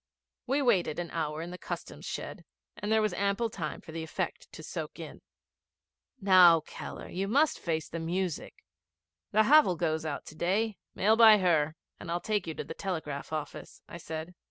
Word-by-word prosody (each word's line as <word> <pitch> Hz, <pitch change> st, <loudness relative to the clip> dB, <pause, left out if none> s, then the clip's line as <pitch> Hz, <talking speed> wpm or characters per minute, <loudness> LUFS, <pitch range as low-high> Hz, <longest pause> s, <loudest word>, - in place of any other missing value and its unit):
We 275 Hz, +3 st, +1 dB
waited 190 Hz, -, +2 dB
an 175 Hz, -1 st, -4 dB
hour 155 Hz, -1 st, -2 dB
in 175 Hz, -, -7 dB
the 180 Hz, -, -8 dB
Customs -, -, -7 dB
shed, -, -, -6 dB, 0.3 s
and 205 Hz, -, -4 dB
there 220 Hz, 0 st, +4 dB
was 215 Hz, -, 0 dB
ample 200 Hz, +3 st, 0 dB
time 155 Hz, -7 st, -5 dB
for -, -, -11 dB
the 165 Hz, 0 st, -5 dB
effect 160 Hz, -, -4 dB
to -, -, -10 dB
soak -, -, -6 dB
in. -, -, -9 dB, 1.0 s
'Now, 180 Hz, -4 st, +7 dB
Keller, -, -, -8 dB
you 195 Hz, +3 st, -3 dB, 0.2 s
face 160 Hz, -, -3 dB
the 165 Hz, -, -5 dB
music. 175 Hz, 0 st, -3 dB, 0.7 s
The 215 Hz, +1 st, +5 dB
Havel 290 Hz, -6 st, +6 dB
goes 160 Hz, -1 st, -1 dB
out 150 Hz, -3 st, -4 dB
to 155 Hz, -, -11 dB
day. 200 Hz, +6 st, 0 dB, 0.2 s
Mail 215 Hz, +3 st, +4 dB
by 225 Hz, -2 st, +8 dB
her, 160 Hz, -5 st, +2 dB, 0.2 s
and 175 Hz, -, -8 dB
I'll 170 Hz, +1 st, 0 dB
take 210 Hz, -2 st, -1 dB
you 160 Hz, -, -4 dB
to -, -, -4 dB
the -, -, -7 dB
telegraph 155 Hz, -8 st, -4 dB
office,' 155 Hz, -2 st, -6 dB
I -, -, -8 dB
said. 160 Hz, +1 st, -6 dB
175 Hz, 180 wpm, -30 LUFS, 160-205 Hz, 1.0 s, by